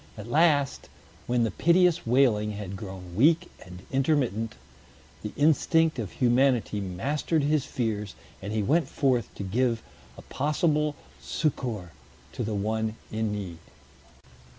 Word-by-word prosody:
At -, -, -7 dB
last, 145 Hz, 0 st, +2 dB, 0.4 s
when 120 Hz, -1 st, +2 dB
the 115 Hz, -, 0 dB
piteous 175 Hz, -3 st, +3 dB
wailing 115 Hz, -4 st, +3 dB
had 100 Hz, -2 st, -6 dB
grown 95 Hz, -3 st, -8 dB
weak 165 Hz, -, +3 dB
and 90 Hz, 0 st, -12 dB
intermittent, 130 Hz, -6 st, 0 dB, 0.7 s
the 105 Hz, -, -5 dB
instinct 160 Hz, +1 st, +3 dB
of 105 Hz, -6 st, -4 dB
humanity 125 Hz, -3 st, +2 dB
mastered 140 Hz, -, -1 dB
his 150 Hz, -1 st, +1 dB
fears, 105 Hz, -4 st, -3 dB, 0.3 s
and 100 Hz, +2 st, -5 dB
he 110 Hz, -1 st, 0 dB
went 155 Hz, +9 st, +2 dB
forth 125 Hz, -5 st, +1 dB
to -, -, -5 dB
give 115 Hz, +3 st, 0 dB, 0.3 s
a -, -, -11 dB
possible 150 Hz, 0 st, 0 dB, 0.3 s
succor 120 Hz, -, -2 dB, 0.4 s
to -, -, -4 dB
the 110 Hz, 0 st, -2 dB
one 110 Hz, +2 st, -1 dB, 0.2 s
in 110 Hz, -1 st, -1 dB
need. 95 Hz, -5 st, -5 dB
120 Hz, 130 wpm, -27 LUFS, 105-150 Hz, 0.7 s, piteous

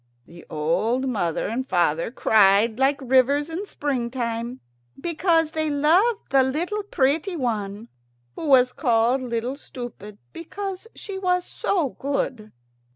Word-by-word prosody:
The 170 Hz, 0 st, -14 dB
old 215 Hz, +12 st, 0 dB
mother 175 Hz, -10 st, -1 dB
and 255 Hz, +5 st, -3 dB
father 170 Hz, -2 st, +1 dB
cried 215 Hz, 0 st, +3 dB
like 275 Hz, +1 st, +2 dB
rivers 270 Hz, +4 st, +2 dB
in 380 Hz, +6 st, -4 dB
springtime, 240 Hz, -4 st, -3 dB, 0.4 s
because 330 Hz, 0 st, +1 dB
they 315 Hz, -1 st, -1 dB
loved 345 Hz, +11 st, +2 dB
the 270 Hz, 0 st, +5 dB
little 335 Hz, +11 st, -1 dB
pretty 325 Hz, 0 st, 0 dB
one, 220 Hz, -5 st, -3 dB, 0.5 s
who 320 Hz, -, -5 dB
was 255 Hz, -3 st, +5 dB
called 240 Hz, -1 st, +2 dB
Little 240 Hz, +1 st, -3 dB
Stupid 240 Hz, -7 st, -9 dB, 0.2 s
because 390 Hz, +4 st, -6 dB
she 395 Hz, -2 st, -6 dB
was 360 Hz, -1 st, +1 dB
so 340 Hz, -8 st, -1 dB
good. 255 Hz, -5 st, -3 dB
260 Hz, 125 wpm, -24 LUFS, 230-320 Hz, 0.5 s, the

